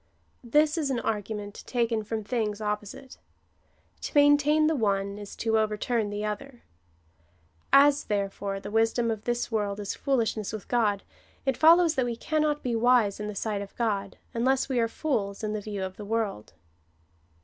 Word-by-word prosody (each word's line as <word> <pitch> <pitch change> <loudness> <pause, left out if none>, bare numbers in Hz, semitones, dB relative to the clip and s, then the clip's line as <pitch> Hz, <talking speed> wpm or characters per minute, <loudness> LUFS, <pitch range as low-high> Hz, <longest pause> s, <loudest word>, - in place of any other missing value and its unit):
This 300 +6 +3
is 290 -3 -1
an 255 -3 0
argument 210 -1 -4
taken 235 -3 0
from 220 0 -4
things 215 -2 -2
opposite. 210 +4 -5 0.8
To - - -5
maintain 290 +1 +5
the 315 +1 +2
one 200 -4 0
is 205 -1 -9
to 225 -1 +1
overturn 215 +1 0
the 205 +1 -3
other. 240 +4 -6 1.1
As, 285 +1 +6
therefore, 200 -1 -2
the 205 +1 -8
wisdom 225 +1 +2
of 215 -1 -5
this 240 0 -1
world 205 -2 -1
is 200 -1 -3
foolishness 230 -6 -1
with 215 - -6
God, 210 -5 +1 0.4
it 270 -1 +1
follows 330 +3 +6
that 260 -5 +1
we 240 -1 -2
cannot 300 +3 0
be 245 -2 -1
wise 230 -3 +3
in 210 - -4
the 210 - -5
sight 205 0 -2
of 200 - -9
God, 200 -4 -2 0.2
unless 260 +3 +1
we 260 -3 0
are 230 - +2
fools 220 -7 -2
in 215 0 -1
the 215 - -3
view 205 -2 -4
of 190 0 -6
the 210 - -7
world. 210 - -2
225 Hz, 170 wpm, -27 LUFS, 205-255 Hz, 1.1 s, As